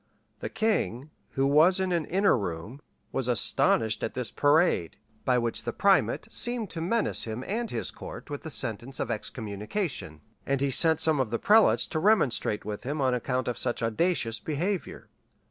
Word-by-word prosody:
[*] - - -44
The - - -5
king, 205 - -1 0.2
who 135 - +1
was 155 +7 +5
in 190 -1 -1
an 170 -3 0
inner 195 +3 +2
room, 100 - -5 0.3
was 130 - -1
astonished 110 -1 +3
at - - -4
this 125 -2 -1
parade, 145 - +2 0.3
by 125 -2 +3
which 115 -1 -1
the - - -4
primate 180 - +2
seemed 240 -4 -2
to 165 - -5
menace 225 +7 0
him 115 +2 -5
and 230 +3 -3
his - - -3
court - - -10
with 145 -2 -6
the 160 - -7
sentence 120 -1 -3
of - - -2
excommunication; 105 - -4 0.2
and 140 0 -1
he 140 0 0
sent 160 +3 +4
some 155 -3 +4
of 130 -4 0
the 115 - -1
prelates 215 - +4
to 155 - -3
remonstrate 155 - +1
with 105 -1 -5
him 145 +4 -4
on 130 -2 +2
account 125 +1 -2
of 125 -1 -3
such 120 -1 -1
audacious 115 -1 0
behavior. 175 +5 -3
135 Hz, 180 wpm, -27 LUFS, 115-175 Hz, 0.3 s, was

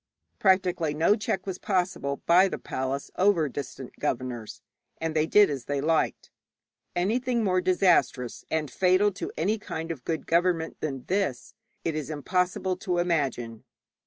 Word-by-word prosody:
Practically 180 -5 +2
no 165 +7 +4
check 195 -3 -2
was 190 -2 -4
possible 180 -8 -1
by 180 +3 +6
the - - -4
palace 130 +1 -4
over 185 -5 +3
distant 135 -1 -7
governors, 125 -5 -3 0.4
and 160 -1 -2
they 155 0 +2
did 205 +3 +6
as 135 -5 -4
they 145 0 -1
liked. 160 +3 0 0.6
Anything 235 +6 +1
more 185 -2 +2
disastrous 180 -9 +2
and 155 -4 -1
fatal 185 +5 +3
to 185 - -6
any 205 +7 +1
kind 165 -5 -5
of 140 -6 -7
good 160 +2 -3
government 170 -1 +1
than 135 -4 -4
this 185 -10 -1 0.3
it 165 - 0
is 155 -2 -4
impossible 180 +4 0
to 180 -3 -2
imagine. 135 -10 -1
170 Hz, 150 wpm, -27 LUFS, 145-185 Hz, 0.6 s, by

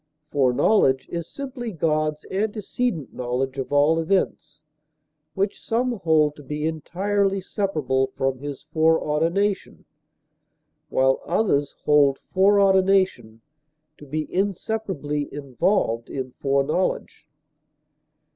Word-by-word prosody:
Foreknowledge 135 - +3
is 170 -1 -4
simply 255 -4 -6
God's 155 -3 -1
antecedent 205 - -2
knowledge 130 +2 -2
of 135 - -4
all 145 +3 +4
events, 160 -3 -1 0.7
which 195 +1 -2
some 245 +2 0
hold 155 -3 +3
to - - -10
be 150 +3 -4
entirely 195 +5 0
separable 155 - -1
from 135 -1 -1
his 145 0 -7
foreordination, 160 +5 0 1.0
while 130 0 +2
others 145 -10 +1
hold 145 -2 +4 0.2
foreordination 190 - +3 0.6
to 150 - -12
be 155 +2 -2
inseparably 190 -6 -2
involved 135 - -1
in 130 -1 -5
foreknowledge. 140 +6 -1
155 Hz, 95 wpm, -23 LUFS, 140-195 Hz, 1.0 s, all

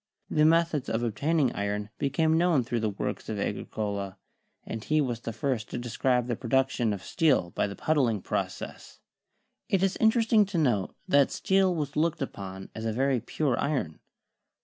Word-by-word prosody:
The 150 0 +4
methods 165 -3 +2
of 115 +1 -1
ob 115 -3 -1
taining 150 +1 +2
iron 105 +1 -2
became 155 +3 +2
known 165 -5 +3
through 120 0 -2
the 110 -1 0
works 100 - -4
of - - -2
Agri - - 0
82 - - -5
CHEMISTRY - - -27
cola, 100 -3 -3 0.5
and 110 -1 -5
he 155 0 +2
was 125 -6 -1
the 115 - -5
first 115 -1 -2
to - - -4
describe 125 +1 0
the 120 -1 -1
production 125 -1 +1
of 100 -2 -4
steel 145 - +2
by - - 0
the 100 - -7
puddling 125 -10 +1
process. - - -4 0.7
It 195 -1 +2
is 195 0 +1
interesting 220 -1 +4
to 195 -3 -3
note 120 - +1
that 140 -1 +4
steel 190 -2 +2
was 150 -3 -3
looked 165 -1 +1
upon 95 -6 -7
as 110 - -6
a 110 - 0
very 130 +2 +1
pure 135 +1 -1
iron. 130 - -1
130 Hz, 190 wpm, -28 LUFS, 110-155 Hz, 0.7 s, The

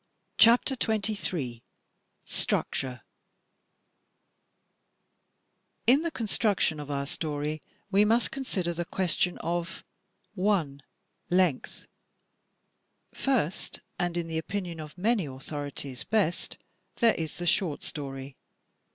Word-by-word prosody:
CHAPTER 240 +4 +7
XXIII 190 - -1 0.6
STRUCTURE 125 -3 0 2.8
In 265 +5 +7
the 335 - 0
construction 210 - +1
of 145 -1 -7
our 140 -1 -1
story 150 0 -2 0.3
we 200 +1 +6
must 230 +3 +3
consider 195 -11 -1
the 175 +1 -2
ques 180 -1 0
tion 180 - +1
of 170 +1 -2 0.5
7. 180 -8 +1 0.5
Length 175 -7 +1 1.3
Fir^t, 215 - 0 0.2
and 175 -1 0
in 170 - -1
the 160 -1 -2
opinion 175 -1 -4
of 155 +2 -8
many 205 -2 +2
authorities 140 -1 -5
best, 200 -6 0 0.4
there 230 -2 +5
is 160 -2 -4
the 175 - -4
short 175 -4 +2
story. 135 -2 -5
175 Hz, 100 wpm, -29 LUFS, 145-205 Hz, 2.8 s, CHAPTER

